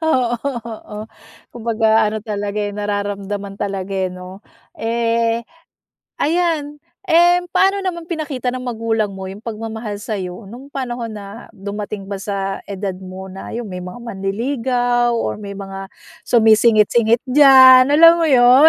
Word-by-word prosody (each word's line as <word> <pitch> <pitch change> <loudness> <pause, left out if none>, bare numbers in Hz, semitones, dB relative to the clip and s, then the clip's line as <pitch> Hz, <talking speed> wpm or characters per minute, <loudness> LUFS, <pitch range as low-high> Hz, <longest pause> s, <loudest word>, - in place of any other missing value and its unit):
Oo, 255 -7 +1 0.3
oo 215 -2 -8 0.6
kumbaga 225 -1 +2
ano 215 +1 -2
talaga, 205 -1 -4
eh, 205 -1 -2
nararamdaman 205 -1 -3
talaga, 195 -1 -4
eh, 190 -1 -1
'no? 185 +2 -10 0.3
Eh, 230 0 0 0.8
ayan. 310 -2 0 0.3
Eh, 350 +2 +5
paano 390 +1 +3
naman 340 -3 -3
pinakita 295 -7 -3
ng 255 - -4
magulang 225 -3 -1
mo 190 0 -7
yung 195 +2 -8
pagmamahal 220 -1 -5
sa'yo 195 -3 -5
nung 250 +7 -11
panahon 245 -3 -4
na 205 +2 -10
dumating 200 0 -6
ba 200 0 -4
sa 195 -1 -3
edad 195 -1 -3
mo 190 0 -9
na 195 - -9
yung 235 0 -4
may 180 0 -6
mga 180 +3 -8
manliligaw 240 +3 -1
or - - -2
may 200 -1 -7
mga 195 -1 -7 0.4
sumisingit-singit 225 0 +4
diyan, 260 -2 +8
alam 330 +2 +7
mo 330 - +3
yun? 255 +3 +7
225 Hz, 140 wpm, -19 LUFS, 200-250 Hz, 0.8 s, diyan